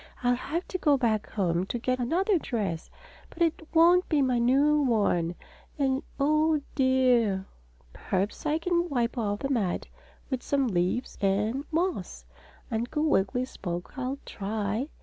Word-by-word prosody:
"I'll 245 0 +4
have 315 +8 -3
to 370 - -3
go 295 -4 +4
back 225 -5 0
home 180 -3 0
to 240 - -2
get 255 +2 -1
another 355 - +1
dress, 200 - -3 0.4
and 340 - 0
it 330 -1 0
won't 350 +2 +5
be 295 -4 +3
my 250 -2 +2
new 280 +5 +4
one 200 -9 +1 0.4
and 270 -1 +1 0.2
oh, 305 +2 +3
dear!" 250 -7 +3 0.5
"Perhaps 195 +9 -2
I 300 +1 +2
can 345 +1 0
wipe 245 -3 0
off 205 -4 -2
the 275 - -2
mud 205 -9 0 0.5
with 260 -1 -1
some 280 -1 +1
leaves 185 +3 -1
and 210 +8 +1
moss," 315 - -2 0.5
Uncle 240 +7 -1
Wiggily 250 -4 +1
spoke. 175 -6 -6
"I'll 265 0 -3
try." 215 +5 -3
250 Hz, 150 wpm, -28 LUFS, 205-300 Hz, 0.5 s, won't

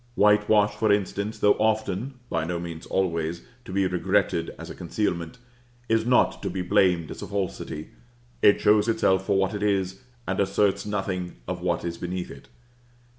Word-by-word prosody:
Whitewash, 105 0 +4
for 105 0 +1
instance, 100 +1 -1
though 105 - +5
often 110 +3 0
(by 80 -1 -1
no 85 +1 -2
means 85 -2 -7
always) 85 -3 -1 0.2
to - - -8
be 95 0 +1
regretted 90 -1 +1
as - - -8
a - - -6
concealment, 85 0 -3 0.5
is 115 0 +1
not 125 - +3
to 100 - -2
be 90 0 -3
blamed 90 -4 +2
as - - -8
a - - -5
falsity. 95 -6 -4 0.5
It 100 - +6
shows 105 +1 +4
itself 95 -4 +2
for 100 - +3
what 95 +2 +1
it 105 - -4
is, 95 -2 0 0.3
and 95 - -1
asserts 100 0 +1
nothing 95 -3 -3
of - - -4
what - - -1
is 85 -1 -4
beneath 90 0 -4
it. - - -13
95 Hz, 175 wpm, -25 LUFS, 90-105 Hz, 0.5 s, It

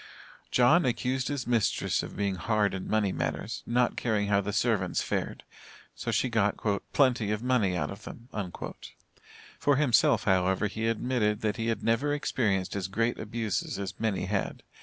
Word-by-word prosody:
John 150 +8 +5
accused 125 0 0
his 140 -4 -2
mistress 115 -5 +1
of - - -8
being 100 -1 0
hard 105 +1 +1
in 95 -1 -5
money 105 -3 +2
matters, - - -3
not 120 0 +2
caring 105 -4 0
how 100 -1 +3
the 100 +1 -3
servants 105 -4 +1
fared, - - -3 0.5
so - - -5
she - - +2
got 110 -4 +1 0.3
"plenty 125 -6 +3
of 105 +2 -1
money 110 -8 +2
out 75 0 -2
of 100 +1 -9
them." 115 - -10 1.3
For 145 - +3
himself, 125 -6 +4
however, 95 +1 +2
he 110 +2 -2
admitted 115 -2 0
that 105 -2 -1
he 115 - -2
had 115 -2 -1
never 115 +6 +1
experienced 100 -10 0
as 95 -2 -2
great 115 +5 0
abuses 110 -3 -2
as 100 -1 -5
many 105 -5 0
had. 95 0 -2
110 Hz, 165 wpm, -29 LUFS, 100-120 Hz, 1.3 s, John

